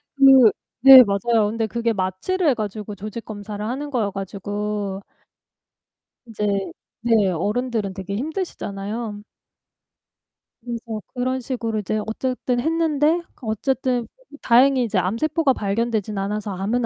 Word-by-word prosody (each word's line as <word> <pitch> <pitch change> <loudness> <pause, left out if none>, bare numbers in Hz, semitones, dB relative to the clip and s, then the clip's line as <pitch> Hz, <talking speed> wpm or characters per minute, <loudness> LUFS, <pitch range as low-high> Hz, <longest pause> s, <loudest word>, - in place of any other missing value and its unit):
그 270 -5 +7 0.3
네 265 -1 +11
맞아요. 220 +1 +1
근데 225 0 -2
그게 235 +1 -1
마취를 200 - -1
해 280 - +5
가지고 210 -1 -5
조직 215 +3 -7
검사를 205 -1 -7
하는 275 +5 -4
거여 225 -6 0
가지고 200 +1 -4 1.3
이제 215 -2 -3 0.6
네 225 -5 +3
어른들은 210 +3 -2
되게 195 +1 -5
힘드시잖아요. 220 - -4 1.4
그래서 230 -2 -5
그런 255 0 -1
식으로 230 -4 -3
이제 215 +2 -2
어쨌든 250 +2 -2
했는데 320 +2 +1 0.2
어쨌든 250 +2 -1 0.3
너무 290 - -13
다행히 255 +2 +4
이제 220 -4 -1
암세포가 270 - +1
발견되지는 215 -1 -2
않아서 210 +1 -3
암은 220 +6 -1
225 Hz, 295 characters per minute, -22 LUFS, 205-255 Hz, 1.4 s, 네